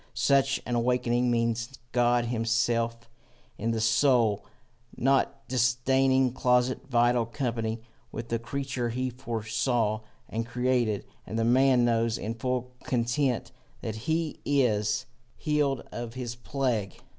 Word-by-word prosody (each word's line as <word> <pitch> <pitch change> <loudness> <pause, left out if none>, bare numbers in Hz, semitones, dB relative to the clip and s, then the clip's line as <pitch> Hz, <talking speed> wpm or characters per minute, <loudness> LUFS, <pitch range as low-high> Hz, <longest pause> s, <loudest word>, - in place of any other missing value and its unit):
Such 135 0 +3
an 125 - -3
awaking 120 0 +1
means 115 +2 0
God 120 0 +3
himself 115 0 0 0.5
in 115 - -1
the 115 -1 0
soul, 110 -2 +3 0.5
not 135 +2 +1
disdaining 130 +1 +2
closest 125 0 +2
vital 120 -1 +3
company 115 -3 -2 0.3
with 115 0 -6
the 115 - 0
creature 130 0 -3
he 130 +2 -2
foresaw 115 -2 -1 0.3
and 115 +1 -2
created. 120 -3 0 0.2
And 110 - -4
the 115 - +1
man 125 0 +4
knows 115 -1 +1
in 110 +3 -3
full 125 +1 -2
content 125 +1 0 0.3
that 110 - -3 0.2
he 160 -1 0
is 105 -7 +1 0.3
healed 145 -3 0
of 120 0 -6
his 125 -2 -4
plague. 120 -5 -2
120 Hz, 120 wpm, -28 LUFS, 115-130 Hz, 0.5 s, man